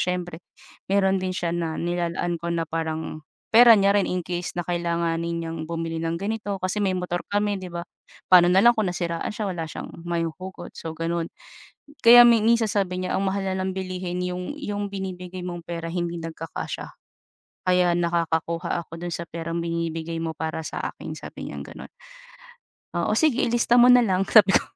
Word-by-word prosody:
siyempre 175 Hz, -2 st, -2 dB, 0.5 s
mayro'n 195 Hz, -1 st, +3 dB
din 185 Hz, 0 st, -2 dB
siya 170 Hz, -2 st, -2 dB
na 165 Hz, -2 st, -2 dB
nilalaan 175 Hz, 0 st, -1 dB
ko 170 Hz, -, -4 dB
na 165 Hz, -1 st, 0 dB
parang 160 Hz, -1 st, -3 dB, 0.3 s
pera 235 Hz, +1 st, +9 dB
niya 200 Hz, 0 st, +4 dB
rin 195 Hz, -, +1 dB
in 180 Hz, -1 st, -1 dB
case 175 Hz, +1 st, -4 dB
na 175 Hz, -, -1 dB
kailanganin 170 Hz, -1 st, -1 dB
niyang 165 Hz, 0 st, -5 dB
bumili 165 Hz, 0 st, -3 dB
ng 165 Hz, 0 st, -2 dB
ganito, 210 Hz, 0 st, -2 dB
kasi 185 Hz, +3 st, -1 dB
may 190 Hz, -1 st, +1 dB
motor 180 Hz, -1 st, -2 dB
kami 205 Hz, 0 st, +1 dB
'di 185 Hz, -, -7 dB
ba? 170 Hz, 0 st, -4 dB, 0.5 s
Paano 180 Hz, -1 st, +8 dB
na 190 Hz, -, +6 dB
lang 240 Hz, -, +8 dB
kung 215 Hz, -3 st, +1 dB
nasiraan 170 Hz, -1 st, -3 dB
siya 210 Hz, -2 st, -3 dB
wala 170 Hz, -3 st, -3 dB
siyang -, -, -7 dB, 0.2 s
mahuhugot 175 Hz, +2 st, -4 dB
so 160 Hz, -, -6 dB
gano'n. 165 Hz, 0 st, -2 dB, 0.7 s
Kaya 240 Hz, +1 st, +10 dB
may 230 Hz, -2 st, +5 dB
minsan 230 Hz, -1 st, +3 dB
sabi 185 Hz, -3 st, -1 dB
niya, 185 Hz, -, -2 dB
"Ang 195 Hz, -, -1 dB
mahal 195 Hz, 0 st, -1 dB
ng 190 Hz, 0 st, -1 dB
bilihin 185 Hz, -1 st, -4 dB
yung 180 Hz, +7 st, -4 dB
yung 205 Hz, -5 st, -3 dB
binibigay 185 Hz, -2 st, -6 dB
mong 175 Hz, -1 st, -5 dB
pera 165 Hz, -1 st, -4 dB
hindi 175 Hz, 0 st, -2 dB
nagkakasya, 165 Hz, 0 st, -6 dB, 0.8 s
kaya 180 Hz, -1 st, +4 dB
nakakakuha 170 Hz, 0 st, 0 dB
ako 165 Hz, -, -9 dB
do'n 175 Hz, 0 st, -4 dB
sa 170 Hz, -, -5 dB
perang 165 Hz, +1 st, -4 dB
binibigay 165 Hz, -1 st, -3 dB
mo 160 Hz, -1 st, -2 dB
para 160 Hz, +1 st, -4 dB
sa -, -, -5 dB
akin." -, -, -8 dB
Sabi -, -, -8 dB
niyang -, -, -6 dB
gano'n. -, -, -10 dB, 1.1 s
"Oo, 190 Hz, +5 st, +1 dB
sige 270 Hz, +1 st, +3 dB
ilista 235 Hz, 0 st, +2 dB
mo -, -, +8 dB
nalang." 220 Hz, -7 st, +5 dB
Sabi 215 Hz, -3 st, +6 dB
ko. -, -, -8 dB
175 Hz, 180 wpm, -24 LUFS, 170-195 Hz, 1.1 s, Kaya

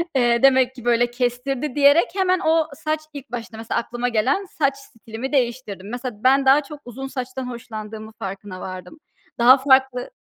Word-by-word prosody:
eee, 240 Hz, -2 st, +2 dB
demek 260 Hz, -1 st, +4 dB
ki 245 Hz, -, -12 dB
böyle 240 Hz, 0 st, +2 dB
kestirdi 250 Hz, +3 st, -2 dB
diyerek 285 Hz, +3 st, +5 dB
hemen 370 Hz, -2 st, +2 dB
o 320 Hz, 0 st, +3 dB
saç 310 Hz, +1 st, -2 dB
ilk 280 Hz, -2 st, -10 dB
başta, 230 Hz, -2 st, -6 dB
mesela, 225 Hz, +1 st, -2 dB
aklıma 240 Hz, +1 st, -3 dB
gelen 255 Hz, -, +1 dB
saç 285 Hz, -6 st, 0 dB
stilimi 230 Hz, -1 st, -8 dB
değiştirdim. 235 Hz, -7 st, -2 dB
Mesela, 245 Hz, -3 st, -6 dB
ben 270 Hz, +1 st, +4 dB
daha 275 Hz, +3 st, +5 dB
çok 290 Hz, +1 st, -11 dB
uzun 255 Hz, +3 st, -7 dB
saçtan 255 Hz, -1 st, -5 dB
hoşlandığımın 220 Hz, -2 st, -8 dB
farkına 195 Hz, -2 st, -7 dB
vardım. 185 Hz, -, -8 dB, 0.4 s
Daha 250 Hz, +3 st, +8 dB
farklı 265 Hz, -2 st, +2 dB
250 Hz, 165 wpm, -22 LUFS, 230-275 Hz, 0.4 s, Daha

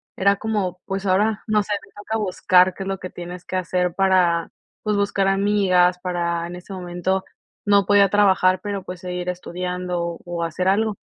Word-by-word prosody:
era 200 Hz, +1 st, +3 dB
como, 200 Hz, -5 st, -2 dB
pues 195 Hz, 0 st, -4 dB
ahora, 205 Hz, +3 st, +1 dB
no 215 Hz, -1 st, +2 dB
sé, 205 Hz, -, -3 dB
me -, -, -23 dB
toca 220 Hz, +2 st, -3 dB
buscar 185 Hz, -2 st, +3 dB
qué 195 Hz, -, -5 dB
es 190 Hz, -, -7 dB
lo 195 Hz, -, -3 dB
que 185 Hz, -, -6 dB
tienes 180 Hz, 0 st, -8 dB
que -, -, -5 dB
hacer 180 Hz, -1 st, 0 dB
para, 180 Hz, -3 st, +2 dB, 0.3 s
pues 210 Hz, -2 st, 0 dB
buscar 200 Hz, -1 st, +1 dB
amigas, 195 Hz, -2 st, +3 dB
para 170 Hz, -2 st, -2 dB
en 175 Hz, -, -7 dB
ese 180 Hz, +2 st, -10 dB
momento 185 Hz, +1 st, -2 dB, 0.4 s
no 200 Hz, -1 st, +4 dB
podía 200 Hz, 0 st, +5 dB
trabajar, 190 Hz, -2 st, +3 dB
pero, 200 Hz, -1 st, -4 dB
pues 180 Hz, -1 st, -8 dB
seguir 180 Hz, 0 st, -4 dB
estudiando, 180 Hz, -1 st, -4 dB
o 175 Hz, -1 st, -3 dB
hacer 170 Hz, +3 st, -2 dB
algo. 210 Hz, +1 st, +1 dB
185 Hz, 185 wpm, -22 LUFS, 180-200 Hz, 0.4 s, podía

